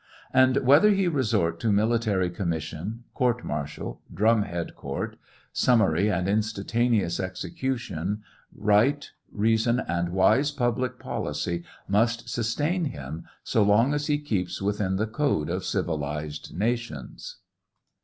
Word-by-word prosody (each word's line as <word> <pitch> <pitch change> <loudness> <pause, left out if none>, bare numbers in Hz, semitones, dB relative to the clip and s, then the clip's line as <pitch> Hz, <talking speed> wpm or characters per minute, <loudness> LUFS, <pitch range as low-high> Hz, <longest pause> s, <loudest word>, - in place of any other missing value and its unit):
And 130 0 +5
whether 145 +11 +7
he 195 -3 +3
resort 110 - +1
to 110 - +1
military 105 -3 +2
commission, 85 +5 -4
court 125 -1 0
martial, 75 0 -5
drumhead 100 -5 +1
court, - - -5 0.4
summary 105 -6 +3
and 90 -2 0
instantaneous 110 -2 +1
execu 95 +8 -2
tion, 105 0 -4 0.3
right, 110 +8 +2 0.2
reason, 115 +3 +2
and 85 0 -1
wise 95 +11 +3
public 125 -2 -1
policy 85 +4 -3 0.2
must 115 +4 +1
sustain 150 +10 0
him 80 - -6 0.2
so 110 - +1
long 105 +7 +4
as 145 0 -1
he 150 -1 +2
keeps 95 -11 -2
within 100 -1 0
the 105 +3 +1
code 110 - 0
of 90 +1 -2
civilized 75 -5 -3
nations. 120 - -3
105 Hz, 120 wpm, -26 LUFS, 90-125 Hz, 0.4 s, whether